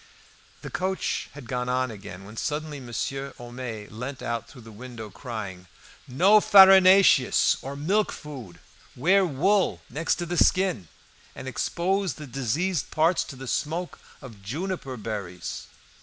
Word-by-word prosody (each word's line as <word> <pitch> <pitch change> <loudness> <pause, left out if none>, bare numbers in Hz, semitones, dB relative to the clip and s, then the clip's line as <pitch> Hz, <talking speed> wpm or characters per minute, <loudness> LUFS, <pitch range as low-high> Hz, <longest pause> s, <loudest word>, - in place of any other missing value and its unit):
The - - -7
coach 185 +2 -2
had 145 -3 -10
gone 125 +1 -2
on 130 -1 0
again 100 -3 -10
when 105 +2 -11
suddenly 150 +3 -3
Monsieur 135 +2 -4
Homais 120 -3 -7
leant 125 +5 -6
out 115 0 -3
through 125 -4 -14
the 115 - -12
window, 110 -1 -9
crying 100 -7 -7 0.4
"No 190 +12 +5
farinaceous 190 -7 +7
or 135 +1 -6
milk 190 +9 +1
food, 125 - -9 0.4
wear 190 +9 +4
wool 155 - +1
next 160 +6 0
the 175 0 -4
skin, 185 - +1 0.5
and 130 - -8
expose 185 +8 -1
the 150 - -9
diseased 140 - -1
parts 165 +3 +2
to 140 - -9
the 135 0 -9
smoke 165 +7 -3 0.2
of 115 -7 -11
juniper 140 - -4
berries." 100 -5 -6
135 Hz, 140 wpm, -26 LUFS, 115-175 Hz, 0.5 s, farinaceous